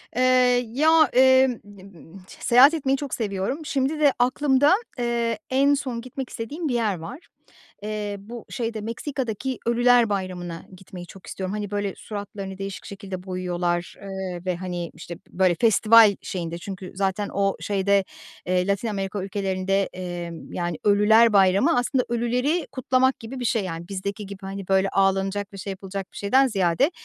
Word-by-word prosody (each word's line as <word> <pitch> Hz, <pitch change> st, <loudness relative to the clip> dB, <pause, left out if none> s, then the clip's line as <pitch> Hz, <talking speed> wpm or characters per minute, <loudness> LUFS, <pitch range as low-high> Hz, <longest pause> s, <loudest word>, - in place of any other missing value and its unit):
Eee, 250 Hz, -, +1 dB, 0.5 s
ya, 315 Hz, +1 st, +5 dB
eee, 260 Hz, +1 st, +6 dB, 0.2 s
n 205 Hz, -2 st, -15 dB
m 190 Hz, -1 st, -14 dB
t -, -, -15 dB
seyahat 255 Hz, +6 st, +7 dB
etmeyi 275 Hz, -4 st, 0 dB
çok 280 Hz, -1 st, -6 dB
seviyorum. 205 Hz, +5 st, -2 dB
Şimdi 285 Hz, +1 st, -1 dB
de 290 Hz, -3 st, +4 dB
aklımda, 265 Hz, +4 st, +3 dB, 0.3 s
eee, 235 Hz, -2 st, -1 dB
en 275 Hz, +2 st, +3 dB
son 260 Hz, -4 st, -3 dB
gitmek 255 Hz, +1 st, -7 dB
istediğim 290 Hz, +8 st, -5 dB
bir 265 Hz, -, -1 dB
yer 215 Hz, -6 st, 0 dB
var. 240 Hz, -, -8 dB, 0.6 s
Eee, 210 Hz, -1 st, -3 dB
bu 225 Hz, +4 st, -10 dB
şeyde 225 Hz, -3 st, -3 dB
Meksika'daki 250 Hz, +1 st, -4 dB
"Ölüler 240 Hz, 0 st, +4 dB
Bayramı'na" 180 Hz, -4 st, -4 dB
gitmeyi 180 Hz, -1 st, -10 dB
çok 190 Hz, +2 st, -14 dB
istiyorum. 190 Hz, 0 st, -4 dB
Hani, 210 Hz, -1 st, -4 dB
böyle, 205 Hz, -2 st, -2 dB
suratlarını 200 Hz, -2 st, -7 dB
değişik 195 Hz, 0 st, -6 dB
şekilde 195 Hz, -2 st, -7 dB
boyuyorlar, 175 Hz, -2 st, -2 dB
eee, 190 Hz, -3 st, -5 dB
ve, 180 Hz, -1 st, 0 dB
hani, 175 Hz, -1 st, -5 dB
işte, 170 Hz, +1 st, -9 dB
böyle, 185 Hz, -1 st, +2 dB
festival 220 Hz, -1 st, +6 dB
şeyinde 170 Hz, -2 st, -4 dB
çünkü, 185 Hz, +1 st, -8 dB
zaten, 195 Hz, +1 st, -1 dB
o 195 Hz, 0 st, +1 dB
şeyde, 200 Hz, 0 st, +1 dB, 0.4 s
eee, 180 Hz, 0 st, +1 dB
Latin 200 Hz, +3 st, 0 dB
Amerika 195 Hz, -2 st, -3 dB
ülkelerinde, 195 Hz, 0 st, -1 dB
eee, 175 Hz, -2 st, -5 dB, 0.2 s
yani, 175 Hz, -2 st, -3 dB
"Ölüler 215 Hz, +2 st, +5 dB
Bayramı" 200 Hz, -, +4 dB
aslında 250 Hz, +1 st, +1 dB
ölüleri 250 Hz, +7 st, 0 dB
kutlamak 260 Hz, 0 st, +1 dB
gibi 240 Hz, +3 st, -8 dB
bir 245 Hz, -, -3 dB
şey, 225 Hz, -2 st, +1 dB
yani. 170 Hz, -2 st, -6 dB
Bizdeki 200 Hz, +1 st, -4 dB
gibi, 195 Hz, 0 st, -10 dB
hani, 195 Hz, 0 st, -7 dB
böyle, 195 Hz, 0 st, +2 dB
ağlanacak 195 Hz, +1 st, 0 dB
ve -, -, -9 dB
şey 195 Hz, +1 st, -5 dB
yapılacak 195 Hz, 0 st, -6 dB
bir -, -, -11 dB
şeyden 260 Hz, +7 st, +3 dB
ziyade, 200 Hz, -, +1 dB
200 Hz, 160 wpm, -24 LUFS, 190-245 Hz, 0.6 s, seyahat